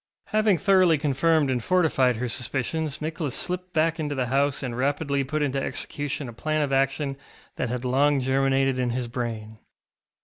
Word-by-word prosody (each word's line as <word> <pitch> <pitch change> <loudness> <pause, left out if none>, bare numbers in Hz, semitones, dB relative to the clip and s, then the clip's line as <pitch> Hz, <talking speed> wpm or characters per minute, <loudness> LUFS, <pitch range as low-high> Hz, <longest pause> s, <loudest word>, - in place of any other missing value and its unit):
Having 215 -3 +3
thoroughly 185 -4 +4
confirmed 145 +1 +2
and 125 -2 -1
fortified 155 -9 +2
her 125 +3 -3
suspicions 140 +5 -2
Nicholas 155 -3 -3
slipped 180 0 -2
back 165 0 +1
into 145 -2 -2
the 130 -2 0
house 140 +3 +1
and 125 -3 -3
rapidly 140 +2 0
put 150 +3 -1
into 135 -1 -1
execution 145 0 -3
a 120 - -8
plan 155 +5 -1
of 140 -1 -2
action 135 +1 0 0.4
that - - -1
had 125 +1 -3
long 140 +3 +3
germinated 135 0 +1
in 125 -1 0
his 120 0 -2
brain. 115 -3 -5
140 Hz, 170 wpm, -25 LUFS, 130-155 Hz, 0.4 s, thoroughly